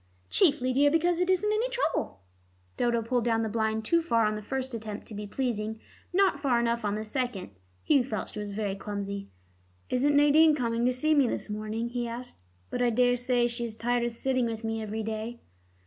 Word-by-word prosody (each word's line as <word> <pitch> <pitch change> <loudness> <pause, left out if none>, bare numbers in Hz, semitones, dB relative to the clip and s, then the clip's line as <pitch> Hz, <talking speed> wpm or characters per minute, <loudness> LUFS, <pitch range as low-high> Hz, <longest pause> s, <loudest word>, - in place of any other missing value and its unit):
"Chiefly, 280 -7 +3
dear, 285 +3 +5
because 335 +3 +2
it 360 +1 +1
isn't 415 +3 +2
any 455 +4 0
trouble." - - -2 0.5
Dodo 235 -1 +1
pulled 240 +1 0
down 225 -1 +1
the 220 - -1
blind 220 0 -1
too 335 +8 +3
far 230 -9 +2
on 215 - +1
the 210 - -5
first 265 +3 -4
attempt 215 -2 -6
to 225 - -10
be 210 0 -5
pleasing, 220 -2 -2 0.3
not 370 -5 +3
far 265 -4 +2
enough 235 0 0
on 205 -1 0
the 215 +1 -4
second. 230 - -3 0.3
Hugh 280 -4 +4
felt 220 -5 -4
she 215 - -7
was 205 -1 -4
very 200 -1 -2
clumsy. 200 0 -5 0.6
"Isn't 280 +3 +2
Nadine 300 +2 +6
coming 235 -3 0
to 250 - +4
see 310 +5 +2
me 280 -4 +4
this 225 - -3
morning?" 215 +2 -3
he 240 0 -2
asked. 235 - -7 0.3
"But - - -2
I 245 - +4
daresay 245 +1 +2
she 240 0 -1
is 225 -2 -6
tired 240 +1 0
of 240 - -1
sitting 255 +1 0
with 225 0 -5
me 225 0 -2
every 220 +1 -4
day." 220 +2 -4
235 Hz, 210 wpm, -28 LUFS, 220-265 Hz, 0.6 s, Nadine